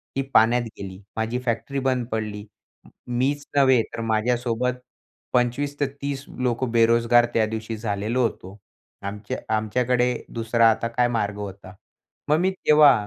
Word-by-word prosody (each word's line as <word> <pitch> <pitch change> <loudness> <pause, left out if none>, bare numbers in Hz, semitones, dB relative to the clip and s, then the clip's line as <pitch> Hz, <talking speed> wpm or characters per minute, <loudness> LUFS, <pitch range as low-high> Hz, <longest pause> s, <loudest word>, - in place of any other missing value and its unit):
ती 135 - +1
पाण्यात 115 +3 +5 0.2
गेली. 95 -1 -8 0.2
माझी 110 +3 -1
फॅक्ट्री 120 +4 -1
बंद 130 -3 0
पडली. 105 -2 -3 0.6
मीच 135 +4 0
नव्हे, 130 -3 +5
तर 115 - -4
माझ्यासोबत 120 +2 0 0.6
25 125 +4 0
ते 145 - +2
30 140 -1 -3
लोकं 125 0 -1
बेरोजगार 115 +1 +4
त्यादिवशी 110 0 -1
झालेलो 110 +3 -1
होतो. 100 -3 -4 0.4
आमच्या 105 +1 -5 0.2
आमच्याकडे 125 +3 +1 0.2
दुसरा 115 0 +3
आता 110 +1 -1
काय 120 +1 +1
मार्ग 105 -4 -1
होता, 100 -2 -8 0.6
मग 150 - +5
मी 185 +2 +2
तेव्हा 150 -5 +6
115 Hz, 135 wpm, -24 LUFS, 110-125 Hz, 0.6 s, तेव्हा